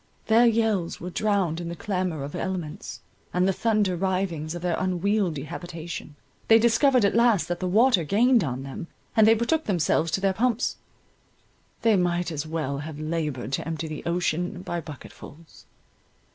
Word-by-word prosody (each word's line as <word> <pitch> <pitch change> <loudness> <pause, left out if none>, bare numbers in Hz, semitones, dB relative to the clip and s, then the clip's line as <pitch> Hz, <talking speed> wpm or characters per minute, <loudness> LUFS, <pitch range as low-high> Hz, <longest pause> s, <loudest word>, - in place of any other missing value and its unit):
Their 230 +2 +5
yells 220 -6 +1
were 180 +2 -6
drowned 190 -5 0
in 170 - -5
the 170 - -5
clamour 180 -5 -2
of 145 - -6
elements, 185 +1 -5 0.3
and 180 +1 +3
the 195 - +2
thunder 210 -3 +1
rivings 175 -4 -2
of 175 - -7
their 175 -2 +1
unwieldy 185 -4 0
habitation—they 170 +4 -2
discovered 235 +1 +4
at 200 - +2
last 235 -5 +3
that 175 0 -2
the 185 - -2
water 220 0 +4
gained 235 - +3
on 130 -3 -3
them, 135 +4 -7 0.3
and 220 -1 +6
they 225 - +7
betook 310 +8 0
themselves 170 -3 +1
to - - +2
their 195 0 +1
pumps; 240 +3 0 1.1
they 225 -2 +5
might 175 -1 0
as 155 0 -4
well 155 -4 -3
have 150 0 -7
laboured 155 -5 -3
to 135 - -2
empty 160 0 -3
the 155 -1 -6
ocean 180 +1 -1
by 175 -2 -3
bucketfuls. 155 +1 -12
180 Hz, 165 wpm, -25 LUFS, 160-210 Hz, 1.1 s, they